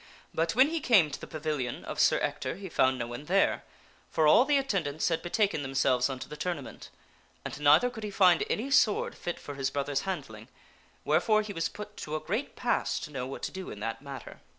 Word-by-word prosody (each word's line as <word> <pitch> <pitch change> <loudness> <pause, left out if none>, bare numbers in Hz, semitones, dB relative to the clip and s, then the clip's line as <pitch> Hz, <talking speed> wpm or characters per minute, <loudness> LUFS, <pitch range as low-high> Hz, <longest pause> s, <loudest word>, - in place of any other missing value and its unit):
But 165 +3 0
when 260 +4 +6
he 330 0 -1
came 200 - +4
to - - -6
the - - -7
pavilion 150 -6 -3
of - - -5
Sir - - +4
Ector - - -2
he 195 +1 -8
found 130 -4 +2
no 120 - -2
one 120 +5 -7
there, 195 +5 +2 0.5
for 160 - +2
all 235 +11 +7
the 290 0 +3
attendants 180 - 0
had 165 - 0
betaken 195 -2 0
themselves 135 -1 +1
unto 130 -1 -5
the 150 - -8
tournament. 150 -2 -5 0.6
And - - -5
neither 150 +12 +5
could 220 -3 -8
he 210 - -3
find 185 -3 +4
any 260 +6 -2
sword 220 -5 +3
fit 175 - -5
for 145 - -8
his 135 -1 -1
brother's 140 0 -1
handling, 135 - -5 0.6
wherefore 215 +8 +3
he 210 -1 -6
was 165 -2 -1
put 210 +2 -9
to 155 - -5
a - - -1
great 215 - -3
pass - - 0
to 150 - -7
know 130 -3 -4
what 135 - -8
to - - -2
do 190 0 -7
in 105 - -8
that 115 +3 -4
matter. 135 -3 -9
155 Hz, 220 wpm, -29 LUFS, 140-205 Hz, 0.6 s, all